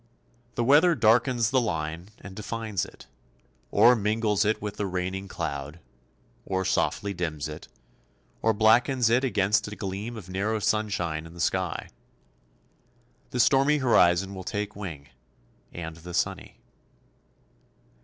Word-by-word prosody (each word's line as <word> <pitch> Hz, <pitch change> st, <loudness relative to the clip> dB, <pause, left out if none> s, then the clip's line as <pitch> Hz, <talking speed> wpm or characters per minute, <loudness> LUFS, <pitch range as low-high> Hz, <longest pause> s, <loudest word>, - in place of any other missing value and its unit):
The 120 Hz, -, 0 dB
weather 150 Hz, +7 st, +5 dB
darkens 120 Hz, 0 st, +3 dB
the 130 Hz, -1 st, +3 dB
line 80 Hz, -3 st, -3 dB
and 95 Hz, -1 st, -11 dB
defines 110 Hz, -1 st, -3 dB
it, -, -, -14 dB, 0.6 s
or 125 Hz, -, +6 dB
mingles 105 Hz, -1 st, +1 dB
it 110 Hz, +1 st, +1 dB
with 105 Hz, -1 st, -5 dB
the 100 Hz, -, -1 dB
raining 95 Hz, +1 st, -3 dB
cloud; 70 Hz, -2 st, -5 dB, 0.6 s
or 95 Hz, 0 st, -2 dB
softly 100 Hz, +2 st, 0 dB
dims 80 Hz, -4 st, -3 dB
it, 75 Hz, 0 st, -9 dB, 0.7 s
or 115 Hz, -, +3 dB
blackens 115 Hz, +3 st, +3 dB
it 125 Hz, +3 st, +3 dB
against 105 Hz, -3 st, +1 dB
a 105 Hz, -, -7 dB
gleam 100 Hz, +4 st, -5 dB
of 100 Hz, -5 st, -9 dB
narrow 100 Hz, +4 st, -1 dB
sunshine 95 Hz, -7 st, -1 dB
in 80 Hz, -, -14 dB
the -, -, -12 dB
sky. 95 Hz, +2 st, -1 dB, 1.4 s
The 125 Hz, -, -4 dB
stormy 135 Hz, +5 st, +4 dB
horizon 95 Hz, -7 st, +3 dB
will 95 Hz, -1 st, -7 dB
take 105 Hz, +2 st, -4 dB
wing, 80 Hz, -9 st, -7 dB, 0.6 s
and 80 Hz, -1 st, -7 dB
the 85 Hz, +1 st, -8 dB
sunny. -, -, -2 dB
100 Hz, 135 wpm, -26 LUFS, 90-115 Hz, 1.4 s, or